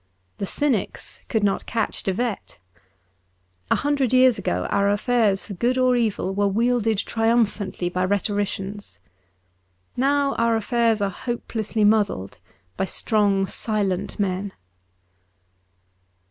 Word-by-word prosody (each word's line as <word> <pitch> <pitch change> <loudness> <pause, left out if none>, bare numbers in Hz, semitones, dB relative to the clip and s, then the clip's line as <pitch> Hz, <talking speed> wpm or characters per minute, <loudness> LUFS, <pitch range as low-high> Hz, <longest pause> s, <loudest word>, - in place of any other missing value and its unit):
The 200 - -2
cynics 265 -6 -2
could 220 -3 0
not 200 -1 0
catch 225 -2 -2
De 195 - -1
Wet. 230 +2 -3 1.1
A - - +4
hundred 280 -3 0
years 255 -2 +5
ago 90 +1 -1
our 200 0 +2
affairs 205 -1 +2
for 205 - -7
good 240 +7 0
or 255 -1 +3
evil 215 -5 0
were 205 +1 +1
wielded 225 +1 +1
triumphantly 225 -4 0
by 180 +1 -1
rhetoricians. 205 0 -2 1.0
Now 280 +2 +2
our 230 0 +3
affairs 225 0 +1
are 200 -1 0
hopelessly 225 0 -3
muddled 205 - +1 0.4
by 190 - 0
strong, 200 -1 +2
silent 200 -2 -2
men. 195 0 -2
215 Hz, 120 wpm, -23 LUFS, 195-235 Hz, 1.1 s, years